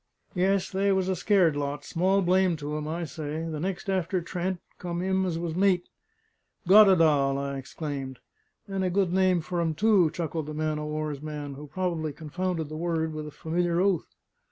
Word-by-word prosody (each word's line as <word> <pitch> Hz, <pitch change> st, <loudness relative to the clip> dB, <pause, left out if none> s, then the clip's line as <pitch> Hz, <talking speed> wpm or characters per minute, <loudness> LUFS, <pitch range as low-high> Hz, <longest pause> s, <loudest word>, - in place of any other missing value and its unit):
Yes, 190 Hz, +1 st, +1 dB
they 195 Hz, +1 st, +2 dB
was 190 Hz, -1 st, +1 dB
a 190 Hz, -, +1 dB
scared 180 Hz, -4 st, +3 dB
lot, 145 Hz, 0 st, -3 dB
small 190 Hz, +3 st, +2 dB
blame 185 Hz, 0 st, +3 dB
to 150 Hz, 0 st, -4 dB
'em, 150 Hz, 0 st, -3 dB
I 165 Hz, +2 st, -3 dB
say! 155 Hz, +1 st, -5 dB
The 155 Hz, -2 st, -4 dB
next 190 Hz, +4 st, -3 dB
after 185 Hz, -1 st, 0 dB
Trent, 180 Hz, +1 st, -3 dB, 0.2 s
come 175 Hz, -1 st, -4 dB
him 190 Hz, +1 st, +1 dB
as 165 Hz, -2 st, -2 dB
was 165 Hz, -1 st, -3 dB
mate." 185 Hz, -1 st, +2 dB, 0.8 s
"Goddedaal!" 165 Hz, -9 st, +6 dB
I 140 Hz, 0 st, -3 dB
exclaimed. 135 Hz, -2 st, -5 dB, 0.5 s
"And 195 Hz, -1 st, -2 dB
a 185 Hz, -, +1 dB
good 180 Hz, -1 st, +1 dB
name 185 Hz, -2 st, +3 dB
for 175 Hz, +2 st, -2 dB
him 165 Hz, -2 st, 0 dB
too," 205 Hz, -4 st, +4 dB
chuckled 160 Hz, -2 st, -4 dB
the 150 Hz, -, -5 dB
man 155 Hz, 0 st, -1 dB
o' 150 Hz, -, -4 dB
war's 150 Hz, -2 st, -3 dB
man, 150 Hz, -2 st, -5 dB
who 145 Hz, +2 st, -9 dB
probably 160 Hz, -2 st, -2 dB
confounded 165 Hz, +2 st, -3 dB
the 155 Hz, -, -7 dB
word 160 Hz, -1 st, -1 dB
with 155 Hz, 0 st, -5 dB
a -, -, -8 dB
familiar 170 Hz, +3 st, -1 dB
oath. 190 Hz, -3 st, +1 dB
170 Hz, 190 wpm, -27 LUFS, 150-185 Hz, 0.8 s, Goddedaal